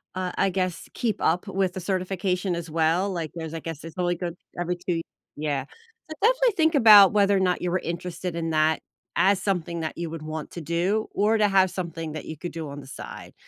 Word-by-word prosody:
uh, 185 -1 -2
I 195 - +3
guess, 185 -2 -2
keep 225 -3 -1
up 180 +5 +1
with 195 -2 0
the - - -4
certification, 185 0 -1
as 170 -1 -5
well. 165 +5 +1
Like, 165 -4 -3
there's, 160 -1 -5
I 165 - -3
guess 165 -1 -7
it's 165 +1 -9
only 175 -1 +1
good 175 0 -4 0.2
every 175 0 -1
2 175 -1 -2 0.4
yeah. 145 -3 -1 0.5
So, - - -4
definitely - - +3
think 320 0 +3
about 210 -7 +9
whether 200 -1 +4
or - - +2
not 180 -2 +1
you 180 -1 -1
were 185 - +1
interested 175 +1 -4
in 165 -1 -2
that 155 0 +2 0.3
as 195 0 +3
something 170 -4 -1
that 155 - -4
you 170 -1 -3
would 165 -1 -6
want 155 0 -5
to 170 - -7
do, 175 +7 0
or 215 +2 +3
to 210 - +4
have 190 -2 +4
something 165 -3 -5
that 155 - -6
you 160 - -6
could 175 +3 -6
do 160 -3 -5
on 140 +1 -7
the 135 - -13
side. - - -9
175 Hz, 225 wpm, -25 LUFS, 165-195 Hz, 0.5 s, about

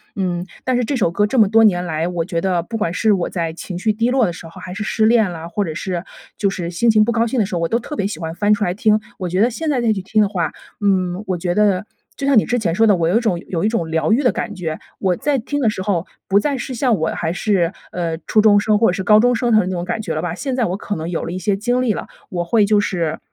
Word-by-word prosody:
嗯， 180 -3 -2 0.2
但 255 - 0
是 250 - +1
这 280 - -1
首 215 -9 +2
歌 205 +4 +2
这 260 - -2
么 215 - +6
多 225 +1 +5
年 180 -4 +2
来， 160 0 -1
我 175 -2 -2
觉 170 -2 -2
得， 180 -2 +1
不 225 +6 -5
管 175 -6 -1
是 220 +4 +2
我 180 -3 -1
在 165 -3 -2
情 175 +2 -7
绪 215 +3 +1
低 230 +3 0
落 255 -2 +3
的 175 - -1
时 165 - -10
候 165 - -12
还 185 -3 -7
是 205 +3 -4
失 215 0 +1
恋 220 -3 +4
了， 165 -1 -7
或 205 +4 -1
者 160 - -4
是 180 -1 -3 0.3
就 200 - +1
是 180 -3 -4
心 180 +7 +1
情 215 -1 +5
不 235 - 0
高 230 0 +2
兴 245 +2 -1
的 - - +2
时 190 -1 -4
候， - - 0
我 165 - +1
都 230 - +2
特 300 - -8
别 200 - -1
喜 200 -6 -6
欢 160 0 -4
翻 205 +3 +3
出 210 - 0
来 180 - 0
听。 215 +2 +2 0.2
我 185 - -3
觉 185 +3 0
得 235 - +4
现 310 +7 -3
在 265 -4 +1
再 230 -2 +2
去 195 - -4
听 215 +3 +1
的 205 - +2
话， 175 -6 -1 0.3
嗯， 185 -2 +1
我 185 -2 -1
觉 175 +1 -1
得， 205 -2 +2 0.3
就 275 - -4
像 275 -3 +4
你 - - -1
之 245 - 0
前 180 -7 0
说 225 +3 +4
的， 205 - +5
我 170 -2 0
有 190 - +3
一 - - +4
种 220 -7 0
有 170 -2 -2
一 - - +4
种 175 -8 -2
疗 160 -1 +1
愈 265 +6 +2
的 250 - +4
感 230 -3 -4
觉。 165 -4 -4 0.2
我 190 -2 +1
再 290 -2 0
听 285 +5 -3
的 240 -6 +2
时 200 - -4
候 185 -3 -1 0.2
不 195 +1 +5
再 280 +5 -1
是 260 +1 -5
像 240 -2 +1
我 160 -1 0
还 165 0 -2
是， 180 -2 +1 0.2
呃， 170 -2 -2
初 215 - +3
中 210 -1 +5
生 210 0 +2
或 225 - +4
者 - - 0
是 190 0 -3
高 210 +2 +6
中 245 +2 +3
生 240 0 0
的 215 - +6
那 - - -2
种 175 -2 -3
感 220 - -2
觉 170 -6 -3
了 155 - -1
吧。 175 0 -3
现 265 +6 -3
在 250 - +1
我 185 0 -2
可 205 - -4
能 160 +1 -4
有 175 - -2
了 - - -4
一 - - -3
些 200 +1 0
经 245 +5 0
历 250 -3 +1
了， - - -6 0.2
我 175 -1 -2
会 215 +4 +3
就 210 0 +3
是 170 -6 -1
200 Hz, 340 characters per minute, -19 LUFS, 175-225 Hz, 0.3 s, 么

